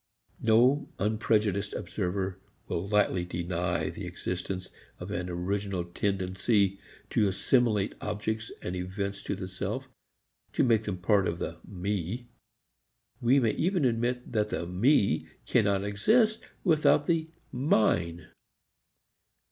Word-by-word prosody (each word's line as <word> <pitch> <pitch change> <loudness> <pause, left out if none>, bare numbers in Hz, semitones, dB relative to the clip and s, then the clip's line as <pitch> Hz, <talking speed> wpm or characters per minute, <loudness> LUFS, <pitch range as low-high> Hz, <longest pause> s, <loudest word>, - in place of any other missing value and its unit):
No 125 +6 +4
unprejudiced 105 -1 +1
observer 95 -1 -2 0.3
will 85 +3 -2
lightly 105 -4 +2
deny 90 0 -2
the - - -6
existence 90 +1 -4 0.3
of 90 +3 -6
an 90 -3 -2
original 95 +1 -2
tendency 95 +2 0 0.3
to 105 - +3
assimilate 105 0 +2
objects 110 +2 -3
and 90 - -3
events 100 +2 -3
to - - -3
the 95 - -5
self, 90 -1 -4 0.7
to - - +3
make 115 -3 +3
them 100 -3 -2
part 100 +1 +3
of 85 - -1
the 85 0 -4
"me." 100 +5 -3 0.9
We 130 +3 +5
may 115 -4 +3
even 180 -3 +1
admit 125 +1 0
that 105 -2 +1
the 85 - -2
"me" 90 - +2 0.2
cannot 100 -5 +2
exist 215 - +3 0.2
without 155 -4 +4
the 165 -1 +1 0.2
"mine." 85 - +1
100 Hz, 120 wpm, -29 LUFS, 90-115 Hz, 0.9 s, We